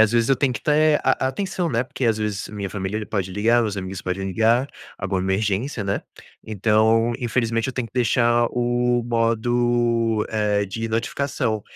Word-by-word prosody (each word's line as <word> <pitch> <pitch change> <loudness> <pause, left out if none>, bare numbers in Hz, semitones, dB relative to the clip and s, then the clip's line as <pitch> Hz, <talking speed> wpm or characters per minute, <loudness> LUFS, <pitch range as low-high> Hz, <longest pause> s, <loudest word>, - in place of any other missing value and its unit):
às 110 -1 +5
vezes 115 0 +2
eu 135 - +5
tenho 135 -3 +1
que 110 - -5
ter 155 0 +3
a 130 0 +2
a - - +2
atenção, 180 0 -2
né 115 +1 +1
porque, 135 -1 -5
às 110 -2 +2
vezes, 105 -2 -3
a - - -12
minha 100 -2 -4
família 105 +2 -3
pode 95 -3 -3
ligar. 115 +4 +3
Meus 105 -2 -2
amigos 95 -1 -5
podem 95 +1 -3
ligar. 115 +7 +2 0.3
Alguma 95 -1 -1
emergência, 100 +5 -1
né. 100 0 -1 0.4
Então, 110 +2 +2
infelizmente, 115 -1 0
eu - - -3
tenho 125 -3 -3
que - - -35
deixar 120 -1 +3
o 120 0 +1
modo, 115 -1 +1
eh, 105 -2 0
de 115 +4 -4
notificação. 115 -1 -1
115 Hz, 185 wpm, -22 LUFS, 105-120 Hz, 0.4 s, às